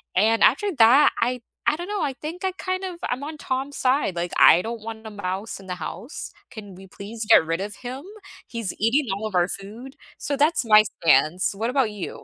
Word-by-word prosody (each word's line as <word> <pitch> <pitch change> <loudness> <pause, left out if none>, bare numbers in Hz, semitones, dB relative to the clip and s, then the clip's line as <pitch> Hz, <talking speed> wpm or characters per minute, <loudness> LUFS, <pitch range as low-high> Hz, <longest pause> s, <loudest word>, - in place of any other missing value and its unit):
and 220 +4 +3
after 400 - +3
that, 245 +6 +7
I 245 +1 0 0.3
I - - 0
don't 350 +5 -7
know, 415 -3 -2
I 285 -3 -1
think 335 +5 -5
I 375 - -1
kind 370 0 -3
of 365 - -5
I'm 255 +3 -3
on 310 +1 -6
Tom's 270 +1 -3
side. 255 -7 +1
Like, 175 0 -3
I 170 - +7
don't 230 +2 -6
want 220 0 -8
a - - -6
mouse 200 0 -5
in 195 - -14
the 180 - -4
house, 195 - -7 0.2
can 205 -4 -10
we 190 +1 -13
please 215 +4 -7
get 190 - +7
rid 165 +1 -2
of 205 +2 -5
him? 255 +3 -7 0.4
He's 230 -4 -4
eating 245 +6 +2
all 205 +3 -4
of 205 - -7
our 175 +1 +2
food, 225 +8 -7 0.2
so, 285 - -3
that's 300 +1 +2
my 215 -2 +6 0.2
stance. 160 +6 +3
What 225 +4 -2
about 255 -4 +1
you? 205 -3 -7
225 Hz, 220 wpm, -23 LUFS, 200-280 Hz, 0.4 s, that